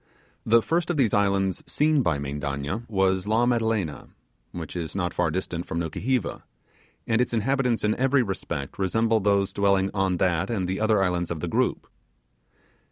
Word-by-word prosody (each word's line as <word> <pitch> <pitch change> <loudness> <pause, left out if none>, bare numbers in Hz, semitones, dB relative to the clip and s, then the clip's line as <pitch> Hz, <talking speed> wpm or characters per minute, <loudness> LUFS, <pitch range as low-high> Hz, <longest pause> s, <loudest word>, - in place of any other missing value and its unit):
The 115 +1 +5
first 170 +1 0
of 175 - 0
these 120 -7 +2
islands 100 -2 +1
seen 150 -1 +2
by 80 - +1
Mendanna 70 +8 -4
was 95 -1 +1
La 115 +3 +3
Madelena, 110 - 0 0.4
which 85 -1 -7
is 85 -1 -4
not 90 -3 -1
far 90 -2 +1
distant 85 0 -3
from 85 - -3
Nukuheva; 105 +9 -2 0.6
and 110 +1 +2
its 125 -1 0
inhabitants 125 +1 +1
in 105 0 +2
every 135 +1 +2
respect 85 -9 -5
resemble 110 +4 +2
those 100 -1 +1
dwelling 100 -1 +2
on 95 -2 +1
that 90 0 +1
and 100 -6 -1
the 95 +1 -2
other 110 -2 +3
islands 90 -2 0
of 85 - -3
the - - -3
group. - - 0
100 Hz, 165 wpm, -25 LUFS, 90-115 Hz, 0.6 s, The